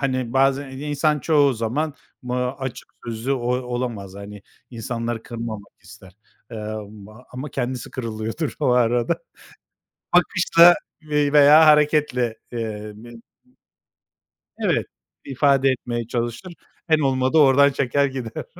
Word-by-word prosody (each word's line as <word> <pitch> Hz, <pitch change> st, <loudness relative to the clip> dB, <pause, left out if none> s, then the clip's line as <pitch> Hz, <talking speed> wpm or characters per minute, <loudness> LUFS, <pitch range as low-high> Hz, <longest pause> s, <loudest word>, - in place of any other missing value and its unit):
hani, 130 Hz, -3 st, -2 dB
bazen 135 Hz, +1 st, +1 dB
insan 150 Hz, +2 st, -1 dB
çoğu 145 Hz, -1 st, +3 dB
zaman, 125 Hz, +7 st, -2 dB, 0.3 s
b 125 Hz, 0 st, -5 dB
ııı, 125 Hz, 0 st, -1 dB
açık 135 Hz, -2 st, -6 dB, 0.2 s
sözlü 120 Hz, +3 st, -3 dB
o 120 Hz, -2 st, -2 dB
olamaz. 120 Hz, -6 st, -5 dB
Hani, 100 Hz, 0 st, -10 dB, 0.3 s
insanları 115 Hz, 0 st, -4 dB
kırmamak 115 Hz, -3 st, -7 dB
ister; 95 Hz, -1 st, -16 dB, 0.4 s
ımm, 105 Hz, -2 st, -7 dB, 0.2 s
ama 130 Hz, +3 st, -6 dB
kendisi 125 Hz, +1 st, -4 dB
kırılıyordur 115 Hz, +4 st, -4 dB
o 145 Hz, -, +1 dB
arada. 120 Hz, -1 st, +2 dB, 1.0 s
Bakışla 175 Hz, -1 st, +6 dB, 0.3 s
ve 150 Hz, -1 st, 0 dB
veya 150 Hz, +2 st, +7 dB
hareketle, 150 Hz, -6 st, +3 dB, 0.2 s
eee, 110 Hz, -2 st, -5 dB
bi 115 Hz, +2 st, -13 dB, 1.4 s
Evet, -, -, 0 dB, 0.4 s
ifade 135 Hz, 0 st, +2 dB
etmeye 120 Hz, -3 st, -3 dB
çalışır. 120 Hz, +9 st, -4 dB, 0.4 s
En 155 Hz, -1 st, +4 dB
olmadı, 130 Hz, +1 st, +1 dB
oradan 140 Hz, -1 st, +6 dB
çeker, 140 Hz, +1 st, +1 dB
gider. 130 Hz, -4 st, -5 dB
125 Hz, 115 wpm, -22 LUFS, 115-140 Hz, 1.4 s, veya